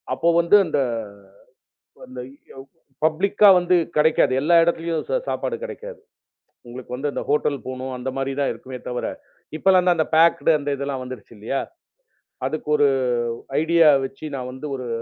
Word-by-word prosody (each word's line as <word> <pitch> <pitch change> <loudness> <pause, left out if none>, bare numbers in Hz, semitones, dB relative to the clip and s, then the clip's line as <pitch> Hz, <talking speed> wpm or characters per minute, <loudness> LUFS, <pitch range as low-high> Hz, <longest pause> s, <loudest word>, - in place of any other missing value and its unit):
அப்போ 170 - +1
வந்து 170 +4 +4
அந்த 155 - 0 1.3
அந்த 125 0 -9 0.3
யவ் 135 0 -11 0.4
பப்ளிக்கா 195 +6 +3
வந்து 180 +1 +2 0.2
கிடைக்காது. 155 -3 +3
எல்லா 165 +4 +3
இடத்துலயும் 165 -1 -1
சு - - -1
சாப்பாடு 470 - -2
கிடைக்காது. - - -8 0.7
உங்களுக்கு 125 +1 -8 0.2
அந்த - - -4
ஹோட்டல் 145 0 +1
போணும். 130 0 -5
அந்த 125 +1 -4
மாதிரி 135 0 -2
தான் 140 - +1
இருக்குமே 125 +2 -10
தவிர 125 0 -3 0.5
இப்பெல்லாம் 185 0 +4
அந்த 160 -2 +1
பேக்டு 165 0 +4
அந்த 145 0 -4
இதெல்லாம் 140 -1 -4
வந்துருச்சு 125 -4 -10
இல்லயா? 110 +6 -3 0.9
அதுக்கு 155 -1 -5
ஒரு 145 -1 +4 0.7
ஐடியா 165 0 +4 0.2
வச்சு 135 +3 -7
நான் 125 -1 -5
வந்து 130 +4 -8
ஒரு 130 -1 -7
150 Hz, 145 wpm, -22 LUFS, 130-170 Hz, 1.3 s, வந்து